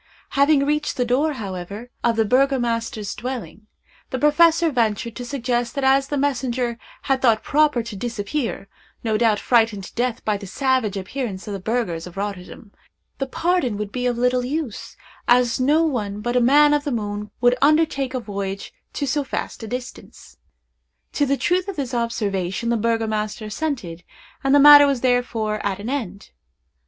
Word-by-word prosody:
Having 280 Hz, 0 st, +3 dB
reached 300 Hz, +1 st, -1 dB
the 250 Hz, -, +1 dB
door, 280 Hz, +6 st, +1 dB
however, 200 Hz, +1 st, -7 dB
of 235 Hz, -1 st, +2 dB
the 225 Hz, 0 st, +2 dB
burgomaster's 235 Hz, -4 st, 0 dB
dwelling, 245 Hz, -4 st, -6 dB, 0.4 s
the 260 Hz, -, -3 dB
professor 325 Hz, +3 st, +4 dB
ventured 230 Hz, -2 st, -1 dB
to 250 Hz, -, -6 dB
suggest 245 Hz, -2 st, -2 dB
that 275 Hz, -, -2 dB
as 270 Hz, +1 st, +3 dB
the 290 Hz, -, -2 dB
messenger 250 Hz, -4 st, -1 dB, 0.2 s
had 270 Hz, -1 st, 0 dB
thought 230 Hz, -4 st, +3 dB
proper 295 Hz, -5 st, +2 dB
to 230 Hz, -2 st, -7 dB
disappear—no 225 Hz, 0 st, -4 dB
doubt 225 Hz, -3 st, +3 dB
frightened 225 Hz, -5 st, +2 dB
to -, -, -10 dB
death 245 Hz, 0 st, -2 dB
by 210 Hz, -1 st, +1 dB
the 200 Hz, -1 st, -9 dB
savage 255 Hz, -2 st, 0 dB
appearance 195 Hz, 0 st, -5 dB
of 205 Hz, -, -4 dB
the 195 Hz, -, -4 dB
burghers 185 Hz, -5 st, -2 dB
of 180 Hz, -, -12 dB
Rotterdam—the 200 Hz, +6 st, -8 dB
pardon 310 Hz, -, 0 dB
would 210 Hz, -1 st, -4 dB
be 250 Hz, +1 st, -1 dB
of 245 Hz, -1 st, -1 dB
little 250 Hz, +1 st, +1 dB
use, 275 Hz, -3 st, -4 dB, 0.3 s
as 245 Hz, -1 st, +3 dB
no 295 Hz, +5 st, +3 dB
one 210 Hz, -9 st, -2 dB
but 240 Hz, +3 st, -2 dB
a 250 Hz, -, +4 dB
man 290 Hz, +4 st, +5 dB
of 295 Hz, -1 st, +1 dB
the 290 Hz, -, -3 dB
moon 210 Hz, -2 st, -3 dB
would 245 Hz, 0 st, +4 dB
undertake 285 Hz, -3 st, +2 dB
a -, -, 0 dB
voyage 200 Hz, -3 st, -5 dB, 0.2 s
to 285 Hz, -, -2 dB
so 290 Hz, +2 st, 0 dB
vast 270 Hz, -, -5 dB
a 225 Hz, -, -6 dB
distance. 250 Hz, +2 st, -8 dB, 0.8 s
To 290 Hz, -, +1 dB
the 275 Hz, +1 st, +1 dB
truth 360 Hz, +5 st, 0 dB
of 395 Hz, -, -4 dB
this 270 Hz, -5 st, -4 dB
observation 210 Hz, -3 st, -2 dB
the 235 Hz, -, +2 dB
burgomaster 220 Hz, -1 st, -1 dB
assented, 215 Hz, -, -4 dB, 0.4 s
and 270 Hz, +1 st, +3 dB
the -, -, +6 dB
matter 290 Hz, 0 st, +9 dB
was 275 Hz, -4 st, 0 dB
therefore 235 Hz, -4 st, 0 dB
at 195 Hz, -2 st, -1 dB
an 210 Hz, +5 st, -5 dB
end. 205 Hz, -8 st, -5 dB
245 Hz, 170 wpm, -22 LUFS, 215-275 Hz, 0.8 s, matter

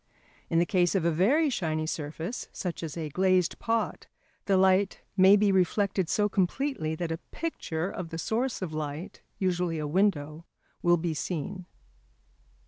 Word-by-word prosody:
In 165 Hz, -, +1 dB
the 170 Hz, -, +4 dB
case 180 Hz, -2 st, +2 dB
of 180 Hz, -4 st, +1 dB
a 170 Hz, -, +3 dB
very 270 Hz, -, +3 dB
shiny 155 Hz, -8 st, -1 dB
surface, 160 Hz, +7 st, -4 dB
such 180 Hz, -3 st, -4 dB
as 165 Hz, -1 st, -5 dB
a 160 Hz, -2 st, -3 dB
glazed 185 Hz, +2 st, +2 dB
pot, 230 Hz, -1 st, -1 dB, 0.4 s
the 195 Hz, -2 st, +3 dB
light 190 Hz, +1 st, +3 dB
may 190 Hz, +1 st, +7 dB
be 205 Hz, -1 st, +3 dB
reflected 190 Hz, -1 st, +1 dB
so 210 Hz, -1 st, +2 dB
completely 195 Hz, -, -1 dB
that 165 Hz, 0 st, -3 dB
a 165 Hz, -, -3 dB
picture 180 Hz, -, -3 dB
of 180 Hz, -3 st, -5 dB
the 165 Hz, -, -5 dB
source 230 Hz, +5 st, -1 dB
of 160 Hz, -4 st, -4 dB
light, 155 Hz, +2 st, -5 dB, 0.2 s
usually 180 Hz, -3 st, 0 dB
a 155 Hz, -, -2 dB
window, 155 Hz, -2 st, 0 dB, 0.4 s
will 175 Hz, 0 st, +4 dB
be 165 Hz, 0 st, -2 dB
seen. 180 Hz, +3 st, -4 dB
180 Hz, 160 wpm, -28 LUFS, 160-195 Hz, 0.4 s, may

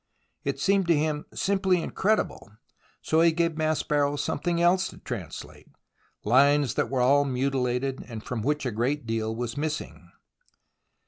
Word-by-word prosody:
It -, -, -2 dB
seemed 195 Hz, -2 st, +2 dB
to 170 Hz, -3 st, +4 dB
him 150 Hz, 0 st, -1 dB
simply 190 Hz, -2 st, +1 dB
incredible, 190 Hz, -, -1 dB, 0.5 s
so 160 Hz, +1 st, +2 dB
he 170 Hz, 0 st, +5 dB
gave 165 Hz, 0 st, 0 dB
Maspero 150 Hz, -2 st, 0 dB
something 170 Hz, +4 st, -1 dB
else 180 Hz, +2 st, +3 dB
to -, -, -11 dB
translate 100 Hz, -11 st, -8 dB, 0.3 s
— -, -, -40 dB
lines 140 Hz, +3 st, +4 dB
that -, -, -1 dB
were 130 Hz, -2 st, 0 dB
all 140 Hz, +3 st, +4 dB
mutilated 130 Hz, -1 st, -1 dB
and 115 Hz, -3 st, -7 dB
from 125 Hz, -3 st, -4 dB
which 150 Hz, +4 st, -1 dB
a 125 Hz, -, -1 dB
great 125 Hz, +5 st, -1 dB
deal 110 Hz, -1 st, -2 dB
was 120 Hz, 0 st, -4 dB
missing. 155 Hz, +1 st, -4 dB
145 Hz, 150 wpm, -26 LUFS, 125-165 Hz, 0.5 s, he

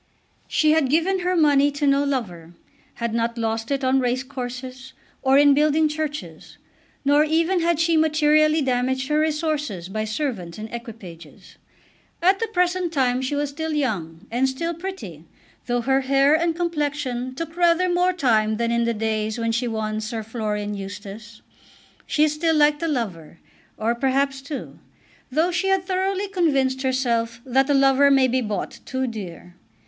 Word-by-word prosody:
She 310 Hz, -1 st, +2 dB
had 310 Hz, -4 st, +2 dB
given 340 Hz, +6 st, +2 dB
her 365 Hz, 0 st, 0 dB
money 290 Hz, -3 st, +4 dB
to 285 Hz, +1 st, -2 dB
no 280 Hz, 0 st, +3 dB
lover, 180 Hz, -12 st, -4 dB, 0.4 s
had 235 Hz, -1 st, -3 dB
not 235 Hz, 0 st, -1 dB
lost 225 Hz, 0 st, -2 dB
it 275 Hz, -1 st, -1 dB
on 260 Hz, +1 st, +3 dB
race 250 Hz, +1 st, 0 dB
courses, 255 Hz, 0 st, -7 dB, 0.3 s
or 265 Hz, +1 st, +4 dB
in 285 Hz, 0 st, +6 dB
building 305 Hz, +2 st, +3 dB
churches; 305 Hz, 0 st, -6 dB, 0.5 s
nor 290 Hz, +2 st, +5 dB
even 330 Hz, +4 st, +1 dB
had 335 Hz, -1 st, +1 dB
she 330 Hz, 0 st, +2 dB
materially 310 Hz, 0 st, +3 dB
damaged 260 Hz, +1 st, -1 dB
her 300 Hz, 0 st, +2 dB
resources 300 Hz, -, -2 dB
by 215 Hz, +2 st, -3 dB
servants 215 Hz, -, -4 dB
and 215 Hz, +1 st, -8 dB
equipages. 210 Hz, -, -10 dB, 0.6 s
At 380 Hz, +3 st, +3 dB
the 455 Hz, -, -1 dB
present 360 Hz, -3 st, 0 dB
time 255 Hz, -4 st, +1 dB
she 260 Hz, +2 st, -2 dB
was 290 Hz, 0 st, -1 dB
still 320 Hz, +2 st, -4 dB
young, 185 Hz, -, -3 dB
and 255 Hz, +3 st, +1 dB
still 335 Hz, +6 st, -3 dB
pretty, 375 Hz, +3 st, -8 dB, 0.4 s
though 245 Hz, 0 st, 0 dB
her 265 Hz, +3 st, +2 dB
hair 275 Hz, +2 st, +3 dB
and 330 Hz, +1 st, +1 dB
complexion 290 Hz, -7 st, -2 dB
took 325 Hz, +3 st, -6 dB
rather 345 Hz, +1 st, +3 dB
more 355 Hz, +1 st, +2 dB
time 220 Hz, -10 st, +1 dB
than 235 Hz, 0 st, 0 dB
in 235 Hz, 0 st, +1 dB
the 235 Hz, 0 st, 0 dB
days 220 Hz, 0 st, -2 dB
when 230 Hz, -1 st, -1 dB
she 240 Hz, +2 st, -1 dB
won 215 Hz, -1 st, -2 dB
Sir 220 Hz, 0 st, -4 dB
Florian 210 Hz, -2 st, -3 dB
Eustace. 205 Hz, +2 st, -9 dB, 0.6 s
She 305 Hz, 0 st, +3 dB
still 320 Hz, +2 st, 0 dB
liked 295 Hz, 0 st, +3 dB
a 330 Hz, -, 0 dB
lover, 195 Hz, -, -4 dB, 0.4 s
or 225 Hz, +2 st, 0 dB
perhaps 270 Hz, +2 st, 0 dB
two, 280 Hz, 0 st, -7 dB, 0.5 s
though 320 Hz, +6 st, +1 dB
she 370 Hz, +2 st, -1 dB
had 385 Hz, -1 st, +1 dB
thoroughly 385 Hz, +1 st, -1 dB
convinced 275 Hz, -9 st, +1 dB
herself 240 Hz, -3 st, 0 dB
that 265 Hz, +2 st, +2 dB
a 285 Hz, -, +3 dB
lover 275 Hz, +1 st, +5 dB
may 270 Hz, -2 st, +4 dB
be 255 Hz, +1 st, 0 dB
bought 210 Hz, -3 st, -4 dB
too 260 Hz, 0 st, -2 dB
dear. 185 Hz, -7 st, -7 dB
270 Hz, 165 wpm, -23 LUFS, 230-310 Hz, 0.6 s, in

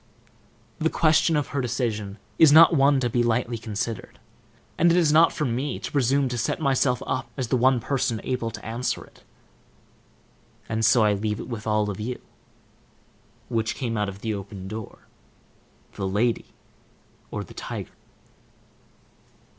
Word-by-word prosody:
The 160 Hz, -, +2 dB
question 160 Hz, +1 st, +3 dB
of 145 Hz, -, -2 dB
her 140 Hz, -, -1 dB
decision 115 Hz, -5 st, -2 dB, 0.2 s
is 160 Hz, -3 st, +8 dB
one 150 Hz, -3 st, +7 dB
not 135 Hz, -, +1 dB
to 125 Hz, -, +1 dB
be 120 Hz, -, +2 dB
lightly 120 Hz, 0 st, 0 dB
considered, 110 Hz, 0 st, -5 dB, 0.6 s
and 170 Hz, -, +4 dB
it 170 Hz, -, +3 dB
is 160 Hz, -4 st, +3 dB
not 165 Hz, +2 st, +6 dB
for 150 Hz, -, -2 dB
me 130 Hz, +3 st, -2 dB
to -, -, -6 dB
presume 140 Hz, 0 st, +2 dB
to 120 Hz, -1 st, -3 dB
set 115 Hz, -, -1 dB
myself 135 Hz, -4 st, +1 dB
up 130 Hz, -, -3 dB
as 130 Hz, -4 st, -3 dB
the 130 Hz, -, +2 dB
one 130 Hz, +1 st, +3 dB
person 120 Hz, -2 st, -1 dB
able 125 Hz, -3 st, -2 dB
to 115 Hz, -, -10 dB
answer 115 Hz, +3 st, -2 dB
it. -, -, -22 dB, 1.4 s
And 110 Hz, 0 st, -2 dB
so 110 Hz, +1 st, +5 dB
I 105 Hz, -1 st, +3 dB
leave 105 Hz, +1 st, -2 dB
it -, -, -7 dB
with 115 Hz, -3 st, -6 dB
all 105 Hz, -1 st, +1 dB
of 95 Hz, -, -8 dB
you: 120 Hz, +4 st, -4 dB, 1.3 s
Which 115 Hz, -2 st, -1 dB
came 120 Hz, -3 st, -3 dB
out 105 Hz, -1 st, 0 dB
of 100 Hz, +1 st, -10 dB
the 110 Hz, -1 st, -2 dB
opened 100 Hz, -1 st, -7 dB
door, 110 Hz, -1 st, -8 dB, 0.9 s
the 95 Hz, -, -3 dB
lady, 115 Hz, +5 st, 0 dB, 0.8 s
or -, -, -4 dB
the -, -, -13 dB
tiger? -, -, -6 dB
120 Hz, 160 wpm, -25 LUFS, 110-135 Hz, 1.4 s, is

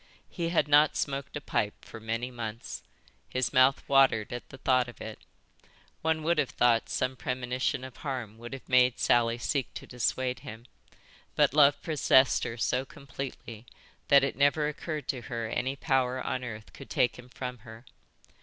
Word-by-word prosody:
He 170 Hz, -2 st, -2 dB
had 170 Hz, -3 st, +2 dB
not 150 Hz, +1 st, +5 dB
smoked 140 Hz, +1 st, -3 dB
a -, -, -7 dB
pipe 105 Hz, -6 st, -2 dB
for -, -, -10 dB
many, 115 Hz, +3 st, -3 dB
months. 115 Hz, -2 st, -6 dB, 0.5 s
His 125 Hz, -2 st, -1 dB
mouth 130 Hz, +1 st, +4 dB
watered 135 Hz, -6 st, +4 dB
at 120 Hz, -, -7 dB
the 135 Hz, -, -11 dB
thought 130 Hz, -2 st, +2 dB
of 120 Hz, -, -11 dB
it. 110 Hz, 0 st, -7 dB, 0.8 s
One 160 Hz, -1 st, 0 dB
would 170 Hz, 0 st, +2 dB
have 135 Hz, -, +1 dB
thought 120 Hz, -2 st, +2 dB
some 130 Hz, +1 st, -1 dB
premonition 125 Hz, 0 st, -2 dB
of 130 Hz, -1 st, -9 dB
harm 125 Hz, -7 st, -5 dB
would 120 Hz, +2 st, -8 dB
have 135 Hz, -, -9 dB
made 125 Hz, -1 st, +4 dB
Sally 120 Hz, -1 st, +2 dB
seek 135 Hz, +2 st, -2 dB
to -, -, -7 dB
dissuade 125 Hz, +1 st, -1 dB
him, 110 Hz, +2 st, -10 dB, 0.7 s
but -, -, +3 dB
love 145 Hz, -1 st, +5 dB
possessed 135 Hz, -4 st, +3 dB
her 115 Hz, -, -5 dB
so 125 Hz, +3 st, 0 dB
completely 135 Hz, -5 st, -8 dB, 0.4 s
that 140 Hz, -1 st, +6 dB
it 140 Hz, -, -1 dB
never 145 Hz, +2 st, +3 dB
occurred 150 Hz, 0 st, -5 dB
to 130 Hz, -4 st, -2 dB
her 115 Hz, -2 st, -3 dB
any 125 Hz, +4 st, -2 dB
power 130 Hz, -3 st, 0 dB
on 130 Hz, 0 st, -3 dB
earth 110 Hz, -3 st, -8 dB
could -, -, -12 dB
take 125 Hz, -, +1 dB
him 125 Hz, 0 st, -13 dB
from 125 Hz, -1 st, -6 dB
her. 115 Hz, +2 st, -13 dB
130 Hz, 175 wpm, -29 LUFS, 120-140 Hz, 0.8 s, that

